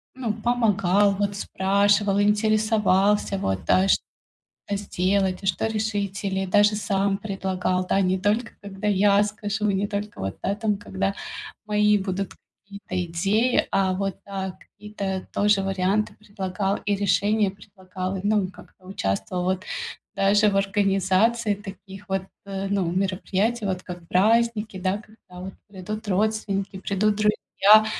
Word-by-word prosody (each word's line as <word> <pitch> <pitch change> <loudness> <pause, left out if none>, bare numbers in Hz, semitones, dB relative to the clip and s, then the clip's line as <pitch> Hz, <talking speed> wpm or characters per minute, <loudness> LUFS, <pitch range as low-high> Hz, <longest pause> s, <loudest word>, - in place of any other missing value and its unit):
ну, 240 -5 -2
помогал, 205 -4 +2
вот, 200 0 -1
спрашивал, 200 +1 +2
интересовался, 210 -1 +2
вот, 95 - -2
да, 190 +1 +4
что - - +3 0.7
сделать, 195 -1 0
что 190 +4 +1
решить, 205 -2 -2
или 195 -1 -1
даже 205 +2 +4
сам 200 -1 0
предлагал, 190 -2 -2
да. 195 - +2
Не 185 0 +2
только 215 +4 0
когда 200 +1 -5
я 205 0 +4
скажу, 210 0 -2
не 200 +1 0
только 205 +1 -5
вот, 95 0 -4
да, 195 - +1
там, 210 -2 0
когда 195 -1 -2 0.5
мои 210 0 +3
будут 190 0 -3 0.3
какие-то 200 -3 -4
идеи, 200 +9 +1
а 190 -1 +2
вот, 195 0 -2
да, 190 -2 -5
какие-то 200 -2 -6
тоже 205 -1 +3
варианты 195 +2 0
предлагал 195 -1 -3
и 205 - +2
решения 205 +1 +2
предлагал. 190 -1 -6
Ну 205 0 +2
и 185 - -4
как-то 185 -1 -17
участвовал 180 - -2
вот 185 +1 -1 0.5
даже 205 +2 +4
в 195 - 0
организации 200 +3 +2
таких 195 0 -11
вот, 190 -1 0 0.2
э, 195 0 -4
ну, 195 -4 0
мероприятий, 195 +4 0
вот 185 -2 -1
как 175 -2 -8
праздники, 220 +1 +2
да, 185 +1 0
когда 210 -4 -14
вот 190 +1 -7 0.2
придут 210 +3 -6
родственники, 200 -1 0
придут 205 +2 +1
друзья. 210 0 +4
200 Hz, 135 wpm, -24 LUFS, 190-210 Hz, 0.7 s, да